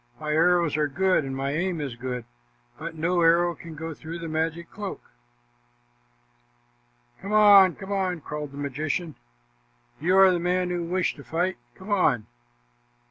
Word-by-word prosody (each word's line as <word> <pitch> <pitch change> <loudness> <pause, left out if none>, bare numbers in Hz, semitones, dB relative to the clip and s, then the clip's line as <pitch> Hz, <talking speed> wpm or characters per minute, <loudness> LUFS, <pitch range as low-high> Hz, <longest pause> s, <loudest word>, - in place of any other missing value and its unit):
"My 155 -1 -3
arrows 170 0 +3
are 150 -1 +1
good 185 +3 +1
and 135 0 -4
my 135 +1 -2
aim 170 +3 -1
is 140 -5 -4
good, 125 -1 -5 0.5
but 165 +1 -6
no 170 +3 0
arrow 170 +1 +4
can 165 -1 -11
go 160 +1 -6
through 160 +3 -8
the 165 -1 -6
magic 160 +1 -3
cloak." 205 -1 -6 2.2
"Come 200 +2 -5
on, 200 -3 +7
come 195 0 -9
on," 185 -3 -1
called 150 0 -6
the 140 - -11
magician. 150 +4 -3 0.9
"You 180 +5 +2
are 190 -1 +7
the 175 - 0
man 180 +1 0
who 175 -1 -2
wished 180 0 -1
to 140 - -11
fight. 180 +5 -1 0.2
Come 190 +3 -9
on." 130 - +2
170 Hz, 160 wpm, -25 LUFS, 150-185 Hz, 2.2 s, on